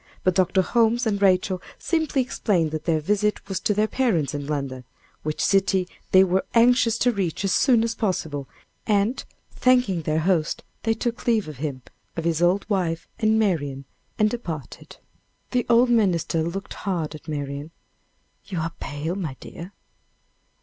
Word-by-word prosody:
But 185 - +3
Dr. 185 +1 +3
Holmes 235 +3 +2
and 205 -2 0
Rachel 185 -1 +3 0.2
simply 315 -5 0
explained 180 -10 0
that 155 0 -4
their 160 -2 +2
visit 210 +5 0
was 190 -2 -2
to - - 0
their 210 +1 +2
parents 195 - 0
in 145 -1 -4
London, 135 -4 -3 0.4
which 155 0 -1
city 195 -2 +2 0.2
they 190 0 +7
were 190 0 +1
anxious 235 -1 +4
to 245 - +3
reach 195 -5 -2
as 195 - +1
soon 240 -1 +4
as 230 - -1
possible, 160 - -2 0.4
and, 210 +3 +1 0.3
thanking 250 -9 +2
their 155 +1 0
host, 170 -2 0 0.2
they 225 -1 +1
took 235 +2 -3
leave 220 -6 +2
of 150 -3 -8
him, 135 -3 -4 0.3
of 165 - -2
his 165 -1 0
old 180 +3 +2
wife, 175 -6 -1
and 220 0 +3
Marian, 145 -10 0 0.3
and 215 0 +3
departed. 165 - -7 0.5
The 250 -2 0
old 240 +1 +5
minister 180 -7 +2
looked 180 +4 -4
hard 170 -6 -3
at 155 - -11
Marian. 145 0 -4 0.8
"You 195 -3 -5
are 165 +1 -3
pale, 145 +4 -4
my 165 -9 -4
dear. 175 +3 -9
185 Hz, 165 wpm, -24 LUFS, 160-220 Hz, 0.8 s, they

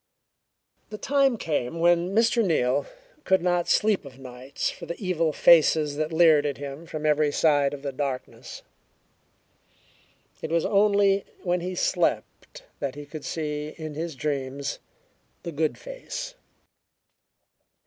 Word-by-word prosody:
The 215 - -7
time 275 0 +2
came 155 - -2
when 175 +1 +3
Mr. 225 +3 +2
Neal 130 -9 +1 0.4
could 190 -2 +2
not 175 -1 +1
sleep 210 -4 +2
of 135 -3 -12
nights 130 0 -5
for 170 - -10
the 170 - -6
evil 170 -5 0
faces 155 -2 +4
that 155 +1 -2
leered 160 -3 +5
at 145 -2 -2
him 145 +3 -8
from 155 -1 -5
every 150 -1 +2
side 145 -2 +3
out 140 - -3
of 140 - -11
the 140 - -3
darkness. 135 -1 -5 1.8
It - - -4
was 165 +1 +1
only 200 -1 +3 0.2
when 180 -1 0
he 180 +1 -4
slept - - -1 0.2
that 140 -2 -3
he 145 0 -8
could 150 +1 -9
see, 150 -1 -4
in 155 -2 -6
his 160 +1 -5
dreams, 140 0 -3 0.6
the 170 - -5
"good 155 0 -1
face." - - -7
160 Hz, 140 wpm, -25 LUFS, 145-185 Hz, 1.8 s, leered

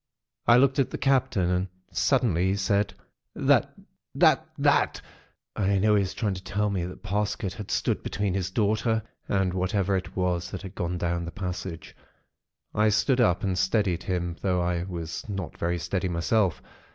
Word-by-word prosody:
"I 120 - +7
looked 135 +2 +4
at 135 - +2
the - - -4
Captain 120 -10 +2
and 90 +1 0 0.2
suddenly 95 - +2
he 95 - +1
said:— 100 +1 0 0.4
"'That—— - - +3 0.4
That—— - - +4
That——,' - - +3 0.6
and 100 -1 +1
I - - +3
know 105 +2 +3
that 105 - +5
he - - +3
was 95 -1 -3
trying 105 -4 0
to 95 0 -7
tell 105 +1 -1
me 90 -3 -1
that 90 - -9
Parsket 105 -1 -1
had 105 -3 -8
stood - - 0
between 100 -2 -2
his 95 -2 -1
daughter 110 +2 +1 0.3
and 95 -2 +1
whatever 95 +1 0
it 95 - -4
was 90 -1 0
that 95 0 -6
had 95 -1 -8
gone 90 -1 -2
down 85 0 -1
the 85 - -6
passage. 90 -3 -6 0.8
I 110 +1 +3
stood 110 +5 +2
up, 90 -7 +3
and 95 -2 0
steadied 95 -1 +1
him; 85 -2 -2
though 90 -2 +1
I 90 -1 0
was 85 +1 -6
not 95 -5 -4
very 85 +1 0
steady 90 +2 -2
myself. 90 +2 +1
95 Hz, 185 wpm, -27 LUFS, 90-105 Hz, 0.8 s, I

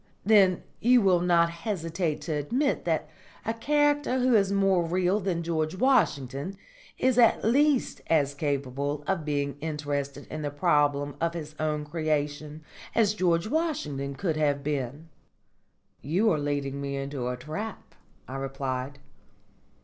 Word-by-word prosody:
"Then 195 -4 +5 0.2
you 245 +2 +5
will 190 -5 +4
not 170 -1 +3
hesitate 170 -3 -3
to 165 - -5
admit 240 - 0
that - - 0 0.4
a 225 - 0
character 290 +2 +1
who 255 0 +3
is 200 -3 +4
more 195 -3 +3
real 180 +4 +1
than 180 -4 -2
George 160 0 -1
Washington 185 - +1 0.4
is 255 -1 +2
at 230 -2 +5
least 280 +3 +2
as 145 -3 +2
capable 140 0 -2
of 190 -2 -1
being 145 -1 -2
interested 145 -2 -3
in 155 - -4
the 145 - -2
problem 145 -2 +1
of 165 0 0
his 155 -2 -6
own 150 -1 -1
creation 150 -1 -2 0.3
as 215 -3 +3
George 175 -4 +1
Washington 215 - -2
could 160 +1 -1
have 145 -2 +1
been." 145 +1 -3 0.9
"You 190 +10 +2
are 155 - +1
leading 140 -1 -2
me 140 0 -3
into 135 -2 -3
a 125 0 -2
trap," 160 - -6 0.3
I 130 - -5
replied. 135 0 -4
155 Hz, 140 wpm, -27 LUFS, 145-195 Hz, 0.9 s, Then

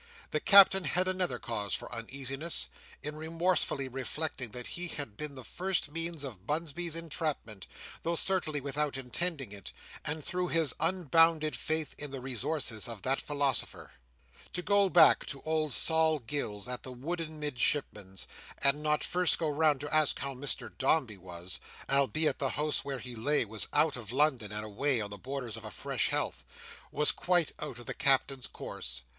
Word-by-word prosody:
The - - 0
Captain 195 -2 +7
had 180 +6 +2
another 185 -1 -1
cause 105 -5 -2
for - - -5
uneasiness, 135 +7 0 0.3
in 150 +1 -5
remorsefully 160 -3 0
reflecting 135 0 -4
that 125 +2 -7
he 180 +1 -3
had 145 -10 -5
been 150 +1 -5
the 130 - -8
first 180 0 -1
means 165 -1 -1
of 110 -8 -8
Bunsby's 165 +2 -2
entrapment, 155 - -3 0.3
though 170 +1 -1
certainly 170 -5 +2
without 140 0 -2
intending 135 - 0
it, 100 -2 -8 0.3
and 150 0 -3
through 180 0 -1
his 165 -5 +2
unbounded 165 -2 +3
faith 155 -1 -1
in 145 - -5
the 135 0 -6
resources 125 -2 -1
of 115 -4 -7
that 135 +1 +1
philosopher. 140 -4 -1 0.6
To 180 - -3
go 200 0 +3
back 165 -4 +7
to 140 - -5
old 155 -1 0
Sol 160 +3 +4
Gills 115 -5 -4
at 125 0 -4
the 130 - -8
wooden 155 +4 -5
Midshipman's, 125 -9 -1 0.3
and 140 +2 +2
not 150 0 +1
first 180 -1 +4
go 160 - -1
round 150 -2 +2
to 145 +1 -5
ask 155 -2 +4
how 140 0 -4
Mr 135 +2 -2
Dombey 130 -6 +1
was—albeit 95 - -1
the 135 - 0
house 150 +2 +1
where 140 -1 -4
he 125 -1 -7
lay 120 +4 +1
was 110 0 +2
out 150 +1 +3
of 115 -3 -8
London, 130 -6 +1
and 105 0 -4
away 120 +5 0
on 105 -1 -3
the 100 - -6
borders 125 -2 -5
of 115 - -10
a 110 - -6
fresh - - -1
heath—was 150 - -2
quite 175 -3 +1
out 140 -5 -5
of 120 - -11
the - - -4
Captain's 135 -1 +2
course. 65 0 -4
145 Hz, 170 wpm, -31 LUFS, 125-160 Hz, 0.6 s, Captain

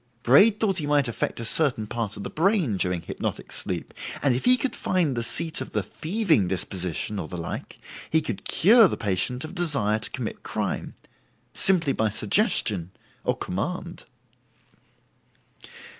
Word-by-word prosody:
Braid 210 +1 +5
thought 195 -4 +1
he 150 - -3
might 145 -2 +2
affect 115 - -3
a 115 - -4
certain 125 -4 +2
part 110 -1 -4
of 100 - -7
the - - -6
brain 170 - +1
during 90 -2 -1
hypnotic - - -5
sleep, - - -3 0.3
and 140 -3 +3
if 125 - -3
he 255 0 +6
could 255 -2 -3
find 170 -8 0
the 120 - -1
seat 160 +6 +2
of 130 - -7
the 105 - 0
thieving 160 - 0
disposition, 95 +2 -2
or 80 - -5
the 90 - -7
like, 85 - -6 0.3
he 160 - +3
could 115 -10 -5
cure 220 +4 +6
the - - -4
patient 110 - -1
of 155 - -9
desire 140 - +1
to - - -1
commit - - -6
crime, - - -4 0.6
simply 170 -7 +3
by 110 -1 0
suggestion, 105 - +2 0.3
or - - -1
command. - - -5
130 Hz, 160 wpm, -25 LUFS, -, 0.6 s, he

